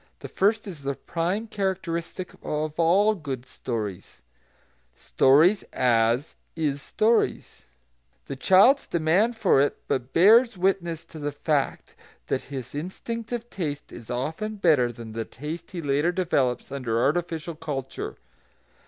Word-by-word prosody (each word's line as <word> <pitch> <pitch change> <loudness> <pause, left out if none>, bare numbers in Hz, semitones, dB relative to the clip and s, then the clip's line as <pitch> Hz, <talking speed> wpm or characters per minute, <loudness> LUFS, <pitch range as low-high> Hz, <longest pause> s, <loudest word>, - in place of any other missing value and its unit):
The - - -8
first 215 +3 +1
is 170 -7 -8
the 140 0 -2
prime 175 +10 -2
characteristic 185 -4 -3
of 155 +1 -3
all 195 +6 +4
good 140 - -6
stories, 105 - -6 0.7
"stories 155 +10 +4
as 120 +2 +2 0.2
is 145 -4 -1
stories"; 225 +8 0 0.6
the 140 - -5
child's 195 - +5
demand 180 +8 +2
for 135 - +4
it 145 - +1
but 130 -2 -2
bears 225 - +6
witness 175 -3 0
to 160 - -11
the 145 0 -2
fact 145 -1 -2 0.3
that 130 - -1
his 130 -4 -6
instinctive 230 +9 -5
taste 150 -6 -4
is 115 -2 -11
often 160 - -3
better 155 -11 +3
than 115 -1 -9
the 115 0 -2
taste 155 +9 -7
he 175 -3 -6
later 145 +4 +2
develops 140 -10 0
under 120 -5 -1
artificial 165 +4 -1
culture. 145 -4 -5
160 Hz, 130 wpm, -25 LUFS, 135-190 Hz, 0.7 s, bears